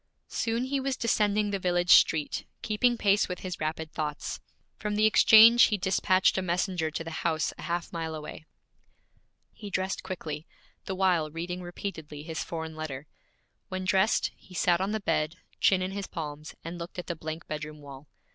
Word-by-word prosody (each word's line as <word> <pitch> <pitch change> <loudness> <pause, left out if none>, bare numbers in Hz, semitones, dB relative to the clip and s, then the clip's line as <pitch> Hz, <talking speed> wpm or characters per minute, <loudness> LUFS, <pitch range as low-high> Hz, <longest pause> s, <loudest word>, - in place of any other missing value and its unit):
Soon 230 +1 -1
he 275 +2 -1
was 265 -1 -2
descending 210 -2 +1
the 200 - -1
village 175 -1 +1
street, 155 -2 +4 0.2
keeping 235 +3 +2
pace 205 -2 +3
with 180 - -5
his 185 -2 -5
rapid 155 +1 -3
thoughts. 150 -2 -4 0.4
From 210 -1 -2
the 215 +1 +3
exchange 225 +2 +8
he 210 - 0
dispatched 185 0 +2
a - - -1
messenger 175 -2 -1
to 160 - -4
the 165 - -7
house 160 -2 0
a - - -11
half 170 +2 -3
mile 165 -1 -3
away. 155 0 -8 1.1
He 210 -2 -9
dressed 190 0 -2
quickly, 165 -5 -6 0.4
the 190 - -3
while 180 -5 +2
reading 175 +3 -5
repeatedly 160 -4 -7
his 160 0 -4
foreign 160 -1 -5
letter. 150 -3 -5 0.6
When 185 0 -4
dressed, 190 +4 +2
he 185 - -16
sat 175 0 +2
on 190 - 0
the 220 0 -2
bed, 155 -4 0 0.2
chin 185 -2 +4
in 185 - -3
his 200 0 -4
palms, 150 -2 -6
and 170 +1 -6
looked 170 +2 -8
at 180 - -4
the 170 - -3
blank 160 +1 -6
bedroom 150 0 -6
wall. 140 0 -11
175 Hz, 180 wpm, -28 LUFS, 160-200 Hz, 1.1 s, exchange